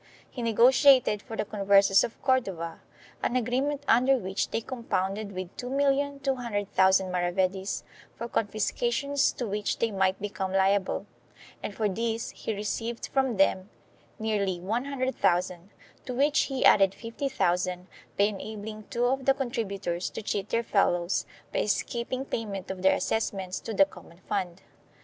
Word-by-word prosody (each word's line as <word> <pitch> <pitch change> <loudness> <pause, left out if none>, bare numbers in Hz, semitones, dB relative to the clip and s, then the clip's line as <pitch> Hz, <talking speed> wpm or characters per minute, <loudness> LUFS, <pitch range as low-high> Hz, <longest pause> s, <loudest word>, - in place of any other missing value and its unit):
He 250 - -6
negotiated 245 0 +5
for 225 -1 -8
the - - -1
Converses 200 -1 +4
of 230 - -5
Cordova 195 -11 0 0.4
an 240 - -1
agreement 260 +4 0
under 255 +4 +5
which 190 -3 -2
they - - -1
compounded 215 -4 -3
with 185 -1 -6
2,200,000 270 -5 0 0.4
maravedis 185 +2 -1 0.3
for 235 - -5
confiscations 240 +6 0
to 245 - -4
which 210 0 -2
they 230 - 0
might 190 -1 +1
become 190 -2 -3
liable, 195 0 +2 0.6
and 205 - -5
for 215 - +1
this 225 +3 -2
he - - -5
received 225 +3 -3
from 265 -5 +1
them 190 0 +2 0.5
nearly 200 -5 -1
100,000, 200 -5 -1 0.4
to 250 - -3
which 290 +3 +3
he 270 -1 0
added 195 -1 +6
50,000 185 -8 -1 0.3
by 200 - +4
enabling 215 +1 -4
two 240 +1 0
of 265 +1 0
the 270 - +4
contributors 200 -9 -3
to 225 - -7
cheat 200 0 -2
their 230 0 +1
fellows 175 -4 +1 0.3
by - - +1
escaping 240 +5 -1
payment 200 -7 -4
of 185 -1 -6
their 190 - +5
assessments 190 -4 -2
to - - -6
the 195 -2 +5
common 170 -3 -15
fund. 185 -2 -3
215 Hz, 140 wpm, -28 LUFS, 190-245 Hz, 0.6 s, added